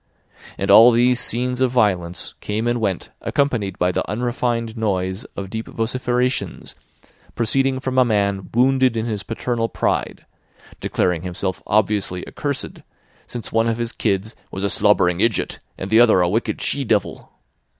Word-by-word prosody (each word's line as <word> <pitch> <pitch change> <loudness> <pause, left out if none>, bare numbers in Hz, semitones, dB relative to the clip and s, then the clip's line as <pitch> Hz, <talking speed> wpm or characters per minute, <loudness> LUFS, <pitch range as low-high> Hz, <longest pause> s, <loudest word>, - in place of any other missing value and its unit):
And - - 0
all 115 +2 +9
these 125 +1 +3
scenes 125 +2 -1
of 130 - +4
violence 95 -8 0
came 110 +3 -2
and 120 0 0
went 95 -5 -2
accompanied 120 -10 -1
by 90 0 +2
the - - -1
unrefined 120 0 -1
noise 95 0 -2
of 95 -1 -5
deep 110 0 -4
vociferations 125 +2 -2 0.6
proceeding 130 +3 +1
from 130 0 0
a - - +7
man 100 -4 0
wounded 130 0 +3
in 110 - -1
his 110 -4 -3
paternal 115 +1 -2
pride, - - -2 0.5
declaring 90 -3 0
himself 90 +1 -4
obviously 100 -3 0
accursed 140 -2 -4 0.5
since 120 -2 -6
one 115 0 +2
of 115 0 0
his 120 -1 -2
kids 105 0 -1
was 95 - -5
a 100 - 0
"slobbering 90 -4 +3
idjut 115 -3 0 0.2
and 95 - -6
the 110 - +6
other 110 -6 +6
a 90 - +3
wicked 110 +7 -1
she 140 - 0
devil." 110 -4 -1
115 Hz, 155 wpm, -21 LUFS, 100-125 Hz, 0.6 s, all